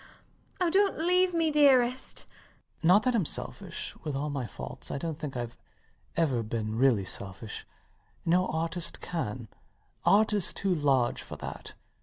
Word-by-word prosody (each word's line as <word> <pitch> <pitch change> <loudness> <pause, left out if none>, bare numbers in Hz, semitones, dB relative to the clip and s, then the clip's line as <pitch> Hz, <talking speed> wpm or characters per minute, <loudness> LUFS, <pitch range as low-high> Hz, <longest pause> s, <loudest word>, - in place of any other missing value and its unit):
Oh, 355 -2 +2
dont 395 +2 +3
leave 360 +3 +3
me, 330 -2 +1
dearest. 260 -4 +3
LOUIS. - - -28
Not 195 +4 +6
that 255 - +2
I'm 225 -5 +2
selfish. - - -4
With 150 -3 -3
all 145 +2 -2
my 135 -4 -3
faults - - -8
I - - -2
dont 160 +1 -4
think 145 -5 -5
Ive 120 -1 -4 0.6
ever 140 -8 +2
been 110 -1 -3
really 115 -5 +3
selfish. 100 +3 -5 0.6
No 180 +2 +3
artist 165 +2 -2
can: 125 -9 -4 0.6
Art 215 +1 +5
is 205 -4 +2
too 195 -2 +1
large 135 -6 +2
for - - -8
that. - - -7
165 Hz, 155 wpm, -29 LUFS, -, 0.6 s, Not